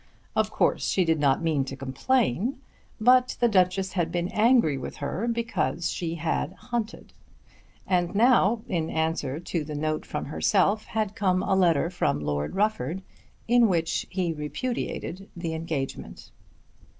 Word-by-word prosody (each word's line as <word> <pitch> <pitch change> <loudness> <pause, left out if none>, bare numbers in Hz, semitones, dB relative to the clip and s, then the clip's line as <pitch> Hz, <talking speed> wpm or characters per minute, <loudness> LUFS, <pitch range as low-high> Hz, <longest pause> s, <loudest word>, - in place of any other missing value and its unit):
Of - - +2
course - - +1
she 185 - +2
did 160 -1 +2
not 140 +2 +2
mean 155 -4 +1
to 135 - -6
complain, 195 - 0 0.4
but 250 +3 +4
the 240 - +4
Duchess 190 -2 +2
had 175 -4 0
been 175 +1 -1
angry 225 - +4
with 130 - -6
her 175 +10 -3
because 230 - -1
she 170 -1 -3
had 165 0 -2
hunted. 235 +1 -5 0.7
And 180 0 0
now, 230 -1 +4
in 165 -4 -1
answer 160 -3 -1
to 170 -2 -3
the 150 0 -6
note 155 +1 -2
from 150 - -4
herself, 200 +7 +1
had 215 -2 -2
come 185 -3 +1
a 195 - +1
letter 170 -3 +3
from 180 - 0
Lord 75 - -2
Rufford 195 -4 0 0.4
in 240 0 +5
which 165 -4 0
he 180 -3 -1
repudiated 190 - -4
the 170 -2 -4
engagement. 150 - -5
175 Hz, 150 wpm, -26 LUFS, 155-215 Hz, 0.7 s, in